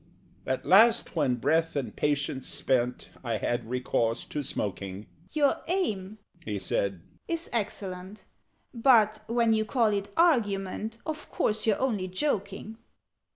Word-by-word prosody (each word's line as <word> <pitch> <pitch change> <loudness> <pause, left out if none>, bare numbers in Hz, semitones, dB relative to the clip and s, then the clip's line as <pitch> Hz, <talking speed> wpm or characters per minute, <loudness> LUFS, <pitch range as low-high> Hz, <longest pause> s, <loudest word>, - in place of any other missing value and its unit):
At 130 - -1
last, 225 +4 +5
when, 130 -6 +2
breath 160 +7 +1
and 140 -3 -3
patience 140 -2 -1
spent, 125 -2 -1
I 115 -3 -1
had 120 +3 -2
recourse 120 -2 0
to 150 - -4
smoking 100 -5 -4 0.3
"Your 290 -2 +2
aim," 215 - -1 0.3
he 105 -2 -3
said, 95 -1 -1 0.3
"is 335 0 -3
excellent: 195 -3 -4 0.5
But 225 -4 +4
when 230 -1 +3
you 220 0 +2
call 220 -1 +2
it 200 0 -2
argument 220 - +1
Of 310 -1 -5
course 215 +1 0
you're 215 - +3
only 215 -8 0
joking?" 200 0 -2
195 Hz, 130 wpm, -28 LUFS, -, 0.5 s, last